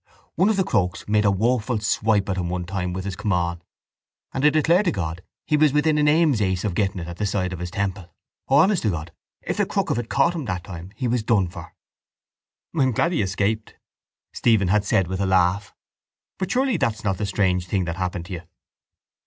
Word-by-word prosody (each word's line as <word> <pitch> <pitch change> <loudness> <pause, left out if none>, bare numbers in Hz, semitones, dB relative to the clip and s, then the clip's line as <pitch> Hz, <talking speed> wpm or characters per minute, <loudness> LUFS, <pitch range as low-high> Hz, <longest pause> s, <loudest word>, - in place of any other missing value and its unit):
One 185 +5 +3
of 220 - +2
the 190 - +3
Crokes 90 - -1
made 105 0 +2
a - - +5
woeful 115 +3 +1 0.2
wipe 105 -2 +2
at 95 -1 -2
him 90 -2 -2
one 90 0 -3
time 90 0 -3
with 95 +1 -4
his 100 -2 -3
caman 90 -4 -1 0.7
and 130 - -2
I 150 - +7
declare 160 +4 +3
to 200 - +1
God 85 -3 -4 0.2
he 150 - +1
was 150 -2 +4
within 150 +1 +2
an 150 - +3
aim's 150 -6 +3
ace 95 -2 0
of 105 -4 -1
getting 95 +1 0
it 85 -2 -5
at 85 0 -7
the 105 - -1
side 95 -2 -1
of 90 - -6
his 90 0 -4
temple. 95 -2 -3 0.4
Oh, 135 - +3
honest 185 +5 +4
to 110 - +1
God, 85 -2 -4 0.3
if - - -3
the - - +2
crook - - -1
of - - 0
it 120 - -5
caught 140 +5 +3
him 160 -5 -4
that 90 -5 -3
time 90 -2 -8
he 130 - -2
was 120 0 +1
done 105 -5 +2
for. - - -11 1.0
—I 155 - +1
am 130 -2 +3
glad 165 +10 +1
he 170 - +1
escaped, 100 +3 -1 0.6
Stephen 110 -6 +2
had 105 +1 +2
said 95 -1 +2
with 95 +2 -3
a 95 - +1
laugh, 95 +3 +2 0.7
but 190 -1 -2
surely 255 0 +1
that's 115 -7 -1
not 95 -2 -1
the 105 - -1
strange 90 -2 0
thing 95 0 0
that 85 0 -4
happened 90 -2 -3
you? 90 -4 -6
100 Hz, 225 wpm, -23 LUFS, 90-130 Hz, 1.0 s, I